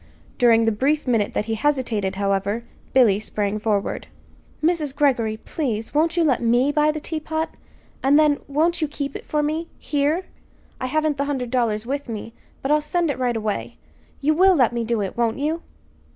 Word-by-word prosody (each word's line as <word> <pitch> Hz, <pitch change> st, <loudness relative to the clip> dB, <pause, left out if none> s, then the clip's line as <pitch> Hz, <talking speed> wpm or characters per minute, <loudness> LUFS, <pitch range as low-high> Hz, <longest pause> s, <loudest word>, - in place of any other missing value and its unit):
During 230 Hz, -2 st, +5 dB
the 225 Hz, -, +3 dB
brief 280 Hz, +8 st, +1 dB
minute 225 Hz, -5 st, +1 dB
that 210 Hz, -, 0 dB
he 225 Hz, -, -2 dB
hesitated, 220 Hz, -6 st, 0 dB
however, 200 Hz, +3 st, 0 dB, 0.3 s
Billy 225 Hz, -7 st, +5 dB
sprang 210 Hz, -1 st, -2 dB
forward. 210 Hz, -2 st, -1 dB, 0.6 s
"Mrs. 310 Hz, -4 st, +1 dB
Greggory, 245 Hz, -7 st, +2 dB
please, 225 Hz, -3 st, -3 dB
won't 325 Hz, +3 st, +2 dB
you 340 Hz, -, +4 dB
let 275 Hz, -7 st, +2 dB
me 240 Hz, +4 st, +3 dB
buy 300 Hz, +1 st, +3 dB
the 310 Hz, -, -4 dB
teapot? 315 Hz, +1 st, -3 dB, 0.5 s
And 275 Hz, +2 st, +4 dB
then 300 Hz, -2 st, +4 dB
won't 325 Hz, +4 st, +1 dB
you 310 Hz, -, +1 dB
keep 285 Hz, -1 st, -4 dB
it -, -, -8 dB
for 300 Hz, -1 st, 0 dB
me 315 Hz, +3 st, -1 dB
here? 300 Hz, +5 st, 0 dB, 0.5 s
I 255 Hz, -, -2 dB
haven't 305 Hz, +1 st, 0 dB
the 280 Hz, -, 0 dB
hundred 260 Hz, -4 st, -3 dB
dollars 230 Hz, -4 st, 0 dB
with 280 Hz, +1 st, -3 dB
me, 225 Hz, 0 st, -6 dB, 0.3 s
but 270 Hz, -, 0 dB
I'll 300 Hz, 0 st, +4 dB
send 335 Hz, +1 st, 0 dB
it 265 Hz, -, -6 dB
right 245 Hz, -2 st, 0 dB
away. 200 Hz, -, -3 dB, 0.4 s
You 300 Hz, +2 st, +3 dB
will 375 Hz, +3 st, +5 dB
let 250 Hz, -6 st, +3 dB
me 235 Hz, -1 st, -1 dB
do 230 Hz, -1 st, 0 dB
it, 195 Hz, -, -3 dB
won't 230 Hz, -1 st, 0 dB
you?" 310 Hz, +4 st, -1 dB
270 Hz, 190 wpm, -23 LUFS, 225-300 Hz, 0.6 s, During